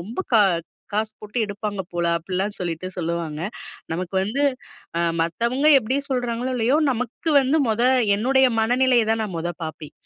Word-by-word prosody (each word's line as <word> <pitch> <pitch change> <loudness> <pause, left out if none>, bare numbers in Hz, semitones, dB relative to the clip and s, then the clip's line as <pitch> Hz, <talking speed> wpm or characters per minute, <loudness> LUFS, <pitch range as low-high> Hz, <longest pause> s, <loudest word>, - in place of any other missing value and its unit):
ரொம்ப 210 +8 -8 0.2
கா 220 - +7 0.5
காசு 215 +1 0
போட்டு 210 +3 -5
எடுப்பாங்க 205 -1 -4
போல." 175 0 0
அப்படிலாம் 190 +4 -3
சொல்லிட்டு 175 0 -3
சொல்லுவாங்க. 165 -2 -3 0.5
நமக்கு 185 +2 -4
வந்து 255 +8 -1 0.8
மத்தவங்க 235 - 0
எப்படி 255 +2 -1
சொல்றாங்களோ 245 -1 -1
இல்லயோ, 250 +3 +2
நமக்கு 250 +6 -3
வந்து 270 +3 +1
மொத 220 +1 +1 0.3
என்னுடைய 265 +5 +3
மனநிலைய 245 +2 +3
தான் 225 0 +1
நான் 205 -4 -4
மொத 175 +1 -2
பார்ப்பேன். 155 -1 -7
215 Hz, 145 wpm, -23 LUFS, 180-245 Hz, 0.8 s, கா